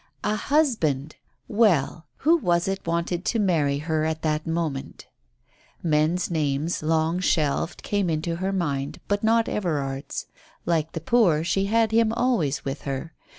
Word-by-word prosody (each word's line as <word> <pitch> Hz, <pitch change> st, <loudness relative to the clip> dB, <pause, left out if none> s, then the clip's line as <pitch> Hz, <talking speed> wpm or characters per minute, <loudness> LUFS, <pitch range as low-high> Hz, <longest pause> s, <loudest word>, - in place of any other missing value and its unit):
A 210 Hz, -, +1 dB
husband! 205 Hz, -, +1 dB, 0.3 s
Well, 170 Hz, -7 st, +2 dB
who 320 Hz, +4 st, +4 dB
was 175 Hz, -, +1 dB
it 195 Hz, -2 st, -3 dB
wanted 170 Hz, +1 st, -1 dB
to 235 Hz, -, +1 dB
marry 155 Hz, -8 st, +2 dB
her 155 Hz, +1 st, -1 dB
at 160 Hz, 0 st, -2 dB
that 155 Hz, 0 st, -1 dB
moment? 160 Hz, -5 st, -3 dB, 0.8 s
Men's 160 Hz, +3 st, +1 dB
names, 150 Hz, 0 st, -1 dB
long 160 Hz, +2 st, +1 dB
shelved, 160 Hz, -2 st, 0 dB
came 200 Hz, -3 st, 0 dB
into 165 Hz, +1 st, -1 dB
her 190 Hz, +2 st, -1 dB
mind, 145 Hz, -7 st, -2 dB
but 205 Hz, +1 st, 0 dB
not 225 Hz, +1 st, +3 dB
Everard's. 145 Hz, -8 st, -2 dB, 0.4 s
Like 160 Hz, -2 st, 0 dB
the 165 Hz, -, -4 dB
poor, 175 Hz, -6 st, +3 dB
she 195 Hz, +3 st, +1 dB
had 225 Hz, +1 st, +2 dB
him 225 Hz, 0 st, +3 dB
always 230 Hz, -, 0 dB
with 135 Hz, +1 st, -4 dB
her. 140 Hz, +4 st, -5 dB
165 Hz, 150 wpm, -25 LUFS, 155-200 Hz, 0.8 s, who